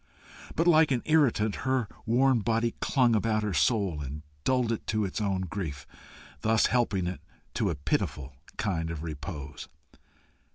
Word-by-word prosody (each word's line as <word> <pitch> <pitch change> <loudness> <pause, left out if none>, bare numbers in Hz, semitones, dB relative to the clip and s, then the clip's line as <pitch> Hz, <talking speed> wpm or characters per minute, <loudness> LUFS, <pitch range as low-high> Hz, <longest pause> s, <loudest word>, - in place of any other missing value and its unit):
But 165 - +2
like 160 -2 +6
an 125 -3 0
irritant, 125 -9 +3
her 130 -3 0 0.2
worn 125 +2 +4
body 115 +1 0
clung 125 -5 +3
about 110 0 +1
her 105 -2 -1
soul 95 - +1
and 75 +2 -6 0.2
dulled 125 -3 +2
it 115 - -4
to 110 -1 +1
its 95 - -3
own 95 -3 0
grief, 85 -6 -5 0.5
thus 110 0 +3
helping 105 -7 +1
it 90 +1 -4 0.3
to - - 0
a 85 - -1
pitiful 70 -1 -2 0.2
kind 85 -6 -1
of 80 -2 -5
repose. 75 -2 -7
105 Hz, 155 wpm, -28 LUFS, 85-120 Hz, 0.5 s, like